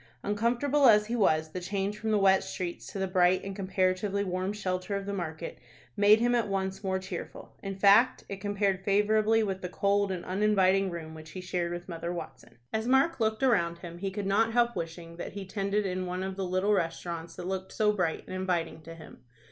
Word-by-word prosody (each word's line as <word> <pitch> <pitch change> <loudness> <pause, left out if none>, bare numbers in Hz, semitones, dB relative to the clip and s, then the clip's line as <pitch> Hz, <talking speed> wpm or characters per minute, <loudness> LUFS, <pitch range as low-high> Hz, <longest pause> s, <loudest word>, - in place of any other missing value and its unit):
Uncomfortable 240 +7 +2
as 210 -2 +6
he 230 +3 -2
was, 155 -8 +2
the 180 - -4
change 195 +2 -2
from 220 - -3
the 215 - +3
wet 195 -1 +4
streets 175 -2 -5
to - - -7
the 190 - 0
bright 185 -1 +3
and 195 0 -5
comparatively 190 +1 0
warm 185 0 -2
shelter 195 -1 -3
of 200 0 -3
the 200 - -3
market 165 -3 -5 0.4
made 210 +2 +6
him 240 +1 +2
at 235 -3 +2
once 195 0 -2
more 190 -1 0
cheerful. 185 0 -7
In 195 -1 -5
fact, 205 +6 +5
it 195 -1 -7
compared 200 -2 0
favorably 215 +2 +3
with 190 -2 -3
the 180 - -4
cold 200 +1 +1
and 180 -2 -4
uninviting 195 0 +2
room 165 -2 -7
which 155 0 -11
he 185 - -6
shared 180 -1 -2
with 175 0 -6
Mother 170 -1 -4
Watson. 170 -7 -8 0.2
As 220 +1 -1
Mark 270 +5 +3
looked 220 +1 0
around 170 -10 +2
him, 170 0 -9
he 195 +1 -2
could 200 +1 -4
not 220 +4 +2
help 240 0 +2
wishing 165 -1 -6
that - - -6
he 200 -1 -6
tended 200 +1 -1
in 185 -1 -2
one 180 +1 -3
of 190 0 -4
the 195 -1 -3
little 185 +3 +1
restaurants 170 -2 -3
that 175 - -7
looked 190 0 -4
so 210 -1 +2
bright 180 -6 -1
and - - -7
inviting 175 -4 -2
to 165 +1 -10
him. 165 - -13
195 Hz, 215 wpm, -29 LUFS, 180-210 Hz, 0.4 s, as